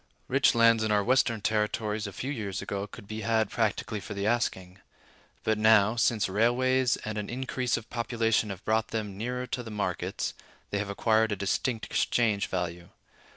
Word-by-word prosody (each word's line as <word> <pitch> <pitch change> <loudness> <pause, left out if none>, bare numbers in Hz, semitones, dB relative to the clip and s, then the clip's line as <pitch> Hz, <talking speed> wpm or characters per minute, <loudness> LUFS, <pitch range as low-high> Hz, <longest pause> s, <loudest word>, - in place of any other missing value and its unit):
Rich 135 -1 +3
lands 115 -1 +5
in 110 - 0
our 105 -1 +3
Western 120 -2 +2
Territories 105 0 -1
a - - -6
few 130 +8 -4
years 105 -8 -4
ago 100 0 -4
could 100 - -12
be 110 +1 -5
had 110 -2 +1
practically 110 -1 -1
for 105 - -7
the 100 0 -2
asking; 95 -5 -1 0.6
but 110 -1 +1
now, 110 0 +5
since 115 -2 +2
railways 125 +5 +2
and 110 -1 -3
an 105 - -5
increase 125 -1 -1
of 110 - -8
population 115 -2 0
have 100 -1 -7
brought 110 0 +1
them 105 -3 -4
nearer 125 +4 -3
to 125 - -3
the 115 - -8
markets, 105 -2 -2 0.4
they 100 - 0
have 100 0 -3
acquired 110 +2 +2
a - - +1
distinct 110 +4 -1
exchange 110 -4 +1
value. 90 -1 -4
110 Hz, 180 wpm, -28 LUFS, 100-115 Hz, 0.6 s, lands